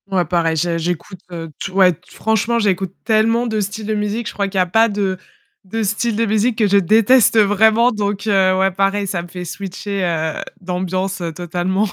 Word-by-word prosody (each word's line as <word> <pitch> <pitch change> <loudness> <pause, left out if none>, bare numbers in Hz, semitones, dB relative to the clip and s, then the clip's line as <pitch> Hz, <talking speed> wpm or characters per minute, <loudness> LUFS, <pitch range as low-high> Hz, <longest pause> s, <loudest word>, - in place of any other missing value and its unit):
Ouais, 185 -2 +1
pareil, 165 0 0
je 170 +2 0
j'écoute, 175 +3 -4
heu, 165 -2 -7
t 195 - -5
ouais, 185 -1 +4
t 165 - -20
franchement, 220 +2 0
j'écoute 190 -4 0
tellement 225 +2 +2
de 220 -2 -1
styles 205 +2 -5
de 215 - -1
musique. 210 +2 -2
Je - - -6
crois 200 -1 -1
qu'il 195 0 -5
y - - +4
a - - +2
pas 225 +6 +3
de 200 -2 -1 0.5
de 220 +4 -3
styles 220 +2 -1
de 230 +2 +1
musique 220 +2 +1
que 215 - +3
je 200 0 +4
déteste 225 +5 +4
vraiment, 220 +4 +4
donc 205 -2 -3
heu, 190 -3 +3
ouais, 190 0 +2
pareil, 195 +2 0
ça 190 -3 -2
me 175 - -10
fait 180 +1 -7
switcher, 195 +2 -5
heu, 160 -3 -1 0.2
d'ambiance, 185 +1 -3
heu, 170 -1 -3
totalement. 180 +4 -1
195 Hz, 210 wpm, -18 LUFS, 180-215 Hz, 0.5 s, ouais